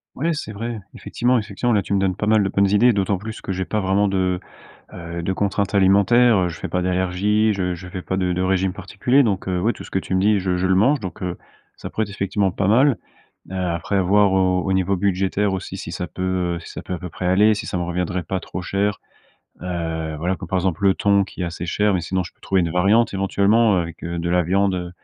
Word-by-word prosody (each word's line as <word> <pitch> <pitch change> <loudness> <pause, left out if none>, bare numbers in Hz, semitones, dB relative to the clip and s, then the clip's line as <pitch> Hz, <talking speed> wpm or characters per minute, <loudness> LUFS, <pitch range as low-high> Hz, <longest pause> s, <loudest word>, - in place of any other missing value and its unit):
Ouais, 160 +6 -1
c'est 145 -7 -5
vrai, 115 +2 -5
effectivement, 125 +1 0
effectivement, 120 +2 -1
là, 100 - +3
tu 100 - -10
me - - +3
donnes 95 -1 0
pas 105 - -3
mal 110 -1 +4
de 95 - 0
bonnes 100 0 +2
idées. 115 +4 +4
D'autant 100 -1 0
plus 110 +3 -8
que - - -5
j'ai 95 0 -2
pas 110 - -1
vraiment 100 +1 +2
de, 95 -2 0 0.5
heu, 85 0 -6
de 95 - -1
contraintes 100 +1 -1
alimentaires. 100 +5 +5
Heu, - - -1
je 85 - -8
fais - - -4
pas 90 - -1
d'allergie, 95 +4 +1
je 90 -3 -1
je 90 +1 -10
fais 90 0 -6
pas 95 - -3
de 90 -1 0
de 90 +1 -1
régime 95 0 +1
particulier. 110 +8 +1
Donc 100 -5 -1
heu, 90 -1 -1
ouais, 115 +5 +2
tout - - -10
ce - - -12
que 95 - +1
tu 95 - -2
me - - +2
dis, 105 +1 +3
je 90 -1 0
je 90 +1 0
le 95 - +3
mange 130 +10 +3
donc 95 0 -7
heu, 90 -1 -3 0.4
ça - - -8
pourrait 110 - -2
être, 100 - -11
effectivement, 100 0 0
pas 95 +1 -2
mal. 130 +5 +4 0.6
Heu, 95 - -5
après, 90 +2 -1
voir 100 +2 +3
au 95 -1 +2
au 95 +1 -1
niveau 95 +1 +1
budgétaire 95 +1 0
aussi, 95 - -5
si - - -7
ça 90 - -4
peut, 85 +3 -9 0.4
heu, - - -7
si - - -11
ça - - -8
peut 90 - -5
à 85 - -4
peu 90 - -7
près 90 - -6
aller, 105 +4 +4
si 110 - -5
ça 95 - -3
me 90 - -1
reviendrait 90 +1 -2
pas 95 - -3
trop 90 0 -6
cher. 100 +3 -1 0.6
Heu, 80 -3 -3
voilà, 90 +4 0
comme, 90 -2 -9
par 95 - 0
exemple, 90 -1 -1
le 95 - +5
thon 100 0 +3
qui 95 -1 -7
est - - 0
assez 85 0 -5
cher 105 +3 +1
mais 90 - +1
sinon, 90 +2 -2
je - - -10
peux - - -41
trouver 95 -2 +1
une 85 - -1
variante, 105 +5 +3
éventuellement, 100 +2 +3
heu, 90 - +2
avec 85 -1 -9
de 85 0 -3
la 90 0 +3
viande, 95 +3 +1
heu. 90 -1 -4
95 Hz, 265 wpm, -21 LUFS, 90-105 Hz, 0.6 s, alimentaires